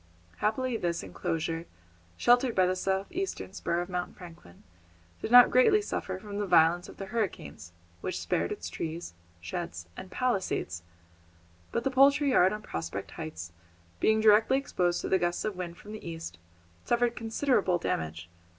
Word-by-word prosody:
Happily 240 +3 0
this 170 -4 -2
enclosure, 165 -1 -3 0.5
sheltered 245 0 +4
by 185 - +4
the 185 +1 +1
south 190 +1 -1
eastern 370 - -4
spur 170 -2 -1
of 175 - -5
Mount 180 -1 -4
Franklin, 165 - -13 0.6
did - - -3
not 245 +1 +9
greatly 330 +12 +5
suffer 190 - -4
from 205 +1 -6
the 205 - -1
violence 170 +1 +4
of - - -12
the 195 - -5
hurricanes, 90 - -4 0.3
which - - -3
spared 85 -1 -1
its 85 - -5
trees, 160 - -5 0.3
sheds, 85 0 -5
and 190 - -9
palisades; 190 - -1 0.9
but 235 - -1
the 270 - 0
poultry 275 +2 +5
yard 185 -6 +5
on 210 0 -5
Prospect 80 - -5
Heights, 80 +2 -7 0.5
being 220 0 +3
directly 215 +4 +5
exposed 180 -10 0
to - - -3
the 190 - +3
gusts 175 0 -1
of 215 -2 -2
wind 175 -1 -6
from 210 - -12
the 215 - -8
east, 165 - -7 0.4
suffered 240 0 +1
considerable 225 -5 +1
damage. 80 - -3
185 Hz, 160 wpm, -29 LUFS, 165-225 Hz, 0.9 s, not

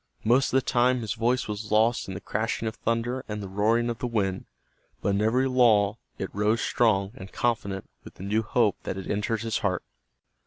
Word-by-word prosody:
Most 125 +5 +3
of 130 - +3
the 135 - +2
time 125 +1 +2
his 110 -1 -2
voice 120 +2 0
was 105 0 -5
lost 110 +3 +3
in 95 - -5
the - - -4
crashing 110 +1 -2
of 110 - -4
thunder 120 +3 -1
and 105 0 -4
the 100 - -5
roaring 110 +5 +1
of 120 -2 -3
the 125 - -2
wind, 95 -5 -1 0.5
but - - -1
in 100 +1 +1
every 125 +5 +2
lull 115 -4 +4 0.2
it 95 - -5
rose 105 +3 +1
strong 100 -5 +2
and 95 -2 -10
confident 100 -5 -1 0.2
with - - -12
the - - -10
new 105 +3 +1
hope 110 -2 +1
that - - -4
had 95 - -6
entered 105 +1 -1
his 115 -1 -1
heart. 95 -4 -1
110 Hz, 210 wpm, -27 LUFS, 100-120 Hz, 0.5 s, lull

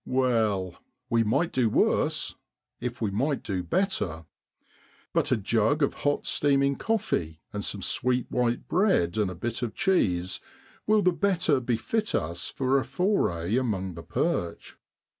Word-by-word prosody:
Well, 110 -8 +1 0.3
we 115 -1 +4
might 135 +10 +1
do 125 -4 +2
worse, - - +1 0.5
if 120 0 -5
we 105 - 0
might 135 +8 0
do 95 -3 -2
better. 90 - -1 0.9
But - - +1
a - - +4
jug 115 +8 +1
of 140 - +2
hot 145 0 -1
steaming 140 -1 +2
coffee, 140 - -1
and 105 0 -3
some 100 -1 -3
sweet 125 -1 0
white 120 -1 0
bread 175 - +2
and 105 -3 +1
a 90 - -6
bit 115 +7 -4
of 120 -3 -3
cheese 95 - +1 0.5
will 215 -1 +4
the 180 - +4
better 175 -6 +2
befit 130 - -1
us 85 +3 -2
for 135 +1 +1
a - - -2
foray 115 - 0
amongst 95 -8 -1
the 85 - -8
perch. 85 +1 -2
120 Hz, 150 wpm, -27 LUFS, 95-145 Hz, 0.9 s, we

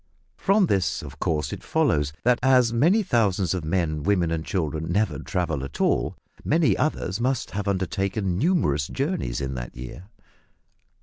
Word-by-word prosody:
From 200 0 +3
this 95 - 0
of - - -10
course 75 -3 -1
it - - -7
follows, 75 -1 +1
that 120 0 +3
as 125 -2 +4
many 175 - +4
thousands 100 - +1
of 90 -3 -3
men, 80 -2 -1
women, 90 0 +1
and 80 -1 -1
children 80 -2 -2
never 90 -7 0
travel 80 -6 -2
at 70 +1 -7
all, - - +1 0.3
many 160 0 +3
others 115 -9 -1
must 130 +2 -1
have 100 0 -3
undertaken 95 0 -1
numerous 105 - +1
journeys 140 - -2
in 65 -1 -3
that - - -7
year. 65 +8 -8
95 Hz, 160 wpm, -25 LUFS, 75-120 Hz, 0.3 s, as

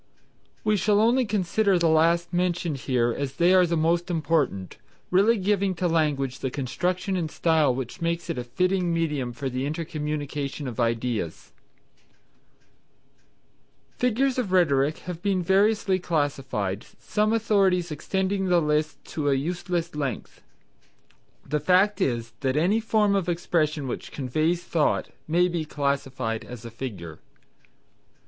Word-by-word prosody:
We 215 -1 +2
shall 205 +2 +3
only 240 +4 +3
consider 200 -1 +1
the 170 -1 +2
last 165 +2 +3
mentioned 175 -3 0
here 120 -2 +2
as 140 -2 -4
they 175 +2 +4
are 185 -1 +5
the 170 0 0
most 170 +3 +1
important, 150 - -1 0.3
really 205 +6 +4
giving 195 -1 +1
to 175 +1 0
language 145 -6 0
the 130 - -2
construction 180 - -2
and 170 -4 -1
style 155 -5 +2
which 130 +6 -6
make 170 0 -1
it - - -3
a - - -3
fitting 180 +7 0
medium 150 -7 -1
for 135 +3 -5
the 130 0 -2
intercommunication 150 -2 -4
of 120 -2 -6
ideas. 115 -7 -2 2.5
Figures 250 +2 +1
of 215 -7 -2
Rhetoric 155 -5 +3
have 180 -2 -6
been 195 -2 0
variously 195 +1 +2
classified, 135 - -2
some 215 0 0
authorities 195 -6 +2
extending 190 +5 -1
the 175 -1 +4
list 150 -1 -1
to 145 -2 -2
a 140 - +3
useless 170 +3 -2
length. 140 -4 -4 1.0
The 150 +2 -1
fact 185 +6 +3
is 115 -7 -1
that 130 +1 0
any 185 +8 +3
form 215 -2 +2
of 190 -3 0
expression 155 -4 0
which 125 - -5
conveys 155 +6 -1
thought 155 -3 0 0.2
may 175 +3 +3
be 170 -2 -2
classified 135 -6 -2
as 120 -1 -10
a 115 - -7
Figure. 105 -10 -7
165 Hz, 140 wpm, -25 LUFS, 140-185 Hz, 2.5 s, are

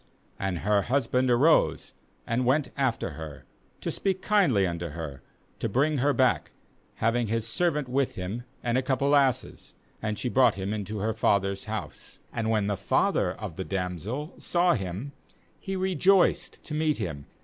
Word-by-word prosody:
3And 95 -2 -1
her 105 0 +3
husband 125 +1 +1
arose, 135 +7 +3 0.3
and 120 +2 0
went 135 +4 +2
after 130 -9 0
her, 75 0 -9 0.4
to - - -2
speak 190 -1 -1
kindly 170 - +3
unto 85 -1 -3
her, 75 -4 -7 0.4
to - - -1
bring 145 +3 +2
her 145 +3 +3
back, 130 -2 +1 0.4
having 115 +1 +1
his 115 +1 -1
servant 150 +2 0
with 135 +1 0
him, 95 +6 -4 0.2
and 120 +1 +2
a - - 0
couple 130 +1 0
of 145 0 +6
asses; 135 -3 -1 0.3
and 105 -1 -2
she - - -2
brought 125 -2 +4
him 95 +2 -3
into 105 0 -4
her 110 +2 -1
father's 100 -3 +1
house; 110 -2 -6 0.2
and 110 -1 -1
when 110 -2 +2
the 100 0 0
father - - +1
of 80 - -7
the 95 - -2
damsel 95 - -3
saw 175 0 +3
him, 100 +4 -4 0.5
he 195 - -4
rejoiced 190 0 +2
to 150 - -7
meet 155 0 +1
him. 70 -10 -5
115 Hz, 170 wpm, -27 LUFS, 100-140 Hz, 0.5 s, of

